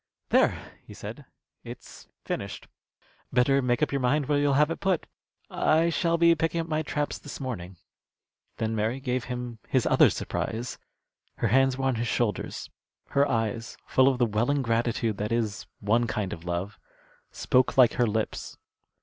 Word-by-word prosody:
"There!" - - +1
he - - -12
said, - - -8 0.4
"it's - - -11 0.2
finished. - - -5 0.6
Better 135 +2 +3
make 125 +2 +1
up - - 0
your 140 -1 -1
mind 140 +4 +2
where 145 +1 +1
you'll 145 -1 +2
have 150 +3 +4
it - - -4
put. 190 -4 0 0.4
I 165 +2 +2
shall 170 0 +1
be 170 0 +6
picking 165 +1 -1
up 165 - -2
my 155 -1 0
traps 145 -1 -2
this 145 - -8
morning." 95 -9 -5 0.8
Then 110 0 -1
Mary 110 +4 -1
gave 125 -2 -2
him 125 -2 -5
his - - +1
other - - +6
surprise. 115 +2 -4 0.6
Her 115 - 0
hands 135 +2 +3
were 135 - -2
on 130 -2 +2
his 120 - -1
shoulders. 115 -4 -2 0.4
Her 140 +1 +2
eyes, 115 0 -2
full 130 0 +4
of 135 -2 +3
the 125 - +3
welling 120 +6 +1
gratitude 115 -2 0
that 105 +2 -3
is 110 -4 -1
one 115 +4 +2
kind 105 -4 -2
of 80 - -9
love, 90 +4 -3 0.5
spoke 130 -1 +1
like 125 -3 +7
her 120 - +2
lips. 110 0 -3
125 Hz, 170 wpm, -27 LUFS, 115-145 Hz, 0.8 s, like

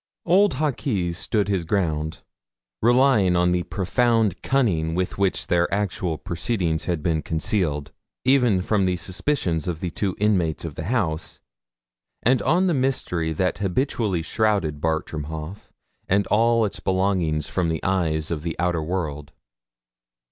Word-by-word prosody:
Old 190 -1 +4
Hawkes 120 - -1
stood 100 +3 0
his 95 -4 0
ground, 80 -4 -1 0.6
relying 120 -6 +4
on 90 0 +3
the 90 0 +1
profound 110 +2 +1
cunning 85 -12 +1
with 90 +1 -2
which 100 -1 +1
their 85 0 +1
actual 95 -5 -1
proceedings 85 -2 -2
had 85 -4 -2
been 80 -3 +1
concealed, 80 -3 -1 0.3
even 125 -8 +3
from 100 -1 +1
the 90 -1 +1
suspicions 90 - -1
of 85 -3 -2
the 90 -1 -3
two 95 0 -2
inmates 90 -7 +1
of 80 - -5
the 80 - -6
house, 90 -8 -2 0.8
and 125 +2 +3
on 180 +4 +2
the 180 - +2
mystery 125 - 0
that 90 +3 -1
habitually 100 - 0
shrouded 95 -8 0
Bartram 80 -2 -2
Haugh 80 +5 -7 0.4
and 100 +1 +3
all 115 +1 +4
its 100 -3 -5
belongings 95 -5 0
from 90 -3 -1
the 80 -2 -2
eyes 80 -5 0
of 80 -3 -2
the 85 +1 -4
outer 85 -2 0
world. 75 -4 -4
90 Hz, 145 wpm, -23 LUFS, 80-105 Hz, 0.8 s, Old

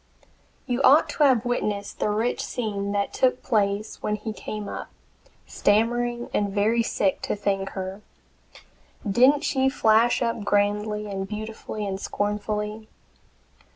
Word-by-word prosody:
You 245 0 -1
ought 280 +3 +6
to 300 - +1
have 255 -4 +3
witnessed 210 -4 -2
the - - +1
rich 220 +4 0
scene 200 -4 -3
that 200 0 -1
took 255 -1 +1
place 205 -3 0
when 210 - -1
he 215 +1 -5
came 210 -1 -6
up, - - -6 0.6
stammering 240 +3 +1
and 205 -1 +1
very 215 +4 +2
sick, 200 -3 0
to - - -2
thank 195 -1 -1
her! 190 +2 -5 1.1
Didn't 255 +8 +5
she 265 -3 +2
flash 230 -1 +3
up 230 -2 -1
grandly 210 +1 0
and 195 -1 -4
beautifully 215 0 -5
and 190 -1 -3
scornfully? 210 +1 -3
210 Hz, 135 wpm, -25 LUFS, 205-240 Hz, 1.1 s, ought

